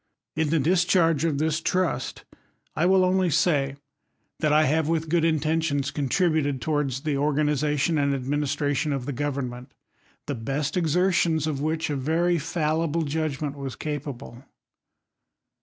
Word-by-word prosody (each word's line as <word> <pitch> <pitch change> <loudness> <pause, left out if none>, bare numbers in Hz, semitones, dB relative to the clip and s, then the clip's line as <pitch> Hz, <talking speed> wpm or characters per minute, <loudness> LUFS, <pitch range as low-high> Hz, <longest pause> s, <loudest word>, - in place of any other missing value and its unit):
In 160 -1 0
the 165 - +2
discharge 165 0 +2
of 155 -4 0
this 155 +2 0
trust, 185 0 -1 0.5
I 165 +3 +2
will 190 0 +4
only 185 0 +2
say, 145 -4 +1 0.6
that 155 -2 +1
I 155 +1 +5
have 155 +2 +1
with 160 -1 -1
good 170 0 +2
intentions 155 -2 0
contributed 145 -1 0
towards 140 -2 -1
the 150 -1 -1
or 145 +2 +1
^< - - -4
ganization 150 +1 +1
and 140 0 +1
administration" 145 +2 -1
of 135 -3 -3
the 145 - -3
government, 130 -2 -4 0.5
thej 125 -6 -5
best 140 +3 -2
exertions 175 -2 +2
of 145 -3 -2
which 155 +1 -1
a - - -1
very 165 +5 +1
fallible 160 +1 -1
judgment 150 -1 -2
wai 140 -1 -5
capable. 140 -4 -6
150 Hz, 145 wpm, -25 LUFS, 140-165 Hz, 0.6 s, I